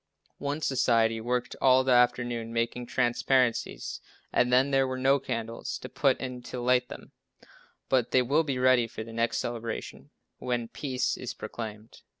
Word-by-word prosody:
One 145 +2 -3
society 115 -5 +2
worked 125 +1 -2
hard - - -15
all 130 0 +6
the 130 - +1
afternoon 120 -2 +2
making 115 +1 -2
transparencies 125 0 0 0.3
and 125 - +3
then 130 +3 +4
there 135 -1 +3
were 130 0 -3
no 135 +2 +3
candles 115 -2 -4
to - - -9
put - - +1
in 125 -1 -5
to 125 +1 -7
light 125 0 +2
them, - - -10 0.8
but 125 -3 +2
they 130 - +3
will 140 +6 +3
be 140 -5 -2
ready 125 -2 +4
for 110 - -7
the 115 +1 -10
next 115 +1 0
celebration 115 -1 -5 0.3
when 120 -2 -2
peace 130 -4 -2
is - - -6
proclaimed. 110 -1 -8
125 Hz, 165 wpm, -28 LUFS, 115-130 Hz, 0.8 s, all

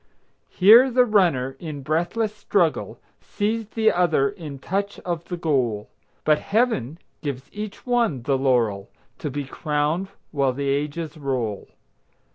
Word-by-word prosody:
Here 225 +8 +7
the 250 0 +4
runner, 170 - +2
in 150 -4 -6
breathless 175 +9 0
struggle, 185 -6 0 0.2
Sees 220 +1 -2
the 220 0 +2
other 165 -6 +2
in 160 -8 -8
touch 200 +8 -3
of 170 -2 -4
the 175 - -5
goal; 130 -11 0 0.3
But 155 -1 +3
Heaven 200 - 0 0.2
gives 140 -4 -5
each 210 -1 -7
one 235 - +1
the 135 +2 +1
laurel, 120 -7 +1 0.3
To 150 - -3
be 145 +1 -3
crowned 150 +6 -1 0.2
while 140 -4 +1
the 140 +1 -2
ages 150 +4 -2
roll. 125 -8 -3
155 Hz, 135 wpm, -23 LUFS, 135-205 Hz, 0.3 s, Here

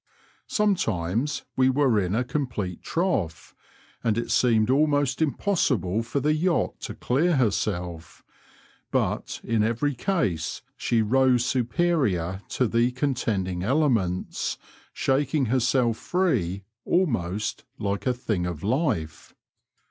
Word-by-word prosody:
Sometimes 135 - 0
we 130 0 +4
were 130 -5 +3
in 95 0 -1
a 125 - +1
complete 120 - -3
trough^ 115 - -2 0.5
and 110 -1 +1
it 115 - -2
seemed 115 -1 +3
almost 145 -1 +2
impossible 130 - +1
for 120 +5 -2
the 150 +3 +2
yacht 170 +2 0
to - - -6
clear 155 +7 +1
herself; 90 - -2 0.7
but - - -1
in 115 -1 +1
every 115 +7 +1
case 120 - -1
she 115 -2 +1
rose 125 +1 +3
superior 120 - 0
to 125 - +1
the 115 +2 +2
contending 110 -9 -1
elements, 110 - 0 0.3
shaking 135 +1 +1
herself 125 -2 +2
free 110 - 0 0.2
almost 110 - 0
like 100 +3 -2
a 125 - +3
thing 105 -7 -2
of 85 -2 -5
life. 105 - -1
120 Hz, 115 wpm, -25 LUFS, 100-145 Hz, 0.7 s, we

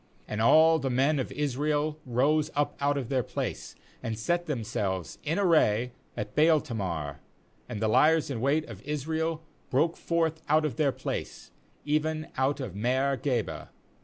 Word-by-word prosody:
^And 105 +1 -2
all 160 +6 +6
the 135 -2 -1
men 135 +4 +2
of 130 - -3
Israel 150 +2 -1
rose 145 +6 +2
up 145 0 0
out 145 0 +1
of 130 -4 -4
their 130 -2 +2
place, - - -5 0.3
and 110 -1 -3
set 175 +10 -1
themselves 105 - -3
in 155 +2 -1
array 125 - +3 0.3
at 105 0 -5
Baal 155 +1 +5
tamar; 85 - -4 0.5
and 115 -4 -4
the 110 - +1
liers 150 +6 +4
in 115 -4 -3
wait 145 +4 +2
of 105 -4 -9
Israel 160 +3 -2 0.3
broke 160 +6 +2
forth 165 -1 -1
out 155 +1 +4
of 135 -7 -3
their 145 -3 +3
place, - - -5 0.3
even 155 +2 0
out 135 +2 +1
of 125 -9 -5
Maareh 130 +6 0
geba. 125 -6 -2
140 Hz, 160 wpm, -28 LUFS, 120-155 Hz, 0.5 s, all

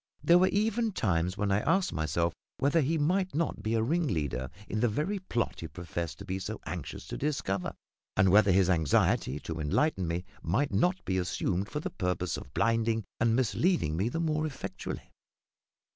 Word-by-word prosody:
There 175 +1 +6
were 185 - +5
even 220 +2 +1
times 90 - 0
when 105 -2 0
I 100 - +3
asked 170 - +1
myself 80 +2 0 0.2
whether 145 +4 +3
he 155 +4 +1
might 180 +4 +1
not 155 -9 -1
be 110 +2 0
a 110 - +2
ringleader 80 - 0 0.2
in 110 - -2
the 120 - +3
very 155 - -1
plot 120 -10 -2
he 80 - -5
professed 85 -1 -5
to - - -9
be 95 +1 -3
so 110 +3 -5
anxious 80 -1 -6
to - - -6
discover, 130 -10 -1 0.4
and 95 0 +5
whether 100 +1 +6
his 95 0 +4
anxiety 80 -4 +2
to 80 -1 -5
enlighten 90 - +1
me 85 +2 -2 0.2
might 115 - 0
not 180 +2 +1
be 95 -1 0
assumed 90 +2 -1
for 150 - -3
the - - -4
purpose 90 -3 -1
of 65 - -8
blinding 115 -1 +2 0.2
and 115 -1 +3
misleading 130 - +1
me 100 +7 +1
the 165 - -3
more 155 -1 0
effectually. 135 - -6
110 Hz, 185 wpm, -30 LUFS, -, 0.4 s, There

